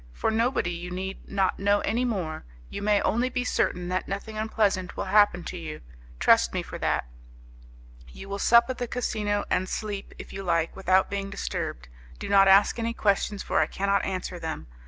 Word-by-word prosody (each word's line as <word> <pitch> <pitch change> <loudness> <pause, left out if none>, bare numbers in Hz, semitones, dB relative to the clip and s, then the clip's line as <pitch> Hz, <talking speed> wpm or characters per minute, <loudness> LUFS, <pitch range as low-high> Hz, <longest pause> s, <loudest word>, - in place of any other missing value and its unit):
'For 65 - 0
nobody. 225 -5 +1
You 175 +1 -6
need 190 +2 -6
not 195 -2 0
know 200 +1 +2
any 235 +4 0
more: 180 -10 -3 0.3
you - - -5
may 205 0 +2
only 245 +3 +1
be 250 0 -2
certain 180 -7 0
that 185 +1 -1
nothing 200 +3 -5
unpleasant 215 -4 0
will - - -1
happen 205 -4 +4
to 180 - -6
you; 155 -2 -7 0.4
trust 65 0 +4
me - - -1
for - - -8
that. - - 0 1.0
You 65 - -11
will 200 0 -4
sup 235 +3 +6
at 255 - -7
the 245 - -2
casino, 210 -4 -1
and 185 +1 +1
sleep, 205 -2 -5
if - - -10
you 195 - -5
like, 170 -3 0
without 190 0 +2
being 200 -1 -3
disturbed. 65 - -4 0.3
Do - - -6
not 195 -1 +6
ask 195 +4 +5
any 230 0 -2
questions, 200 0 0
for - - +1
I 155 - +3
cannot 200 +2 0
answer 185 -2 -4
them. 160 -1 -5
195 Hz, 195 wpm, -26 LUFS, 180-215 Hz, 1.0 s, sup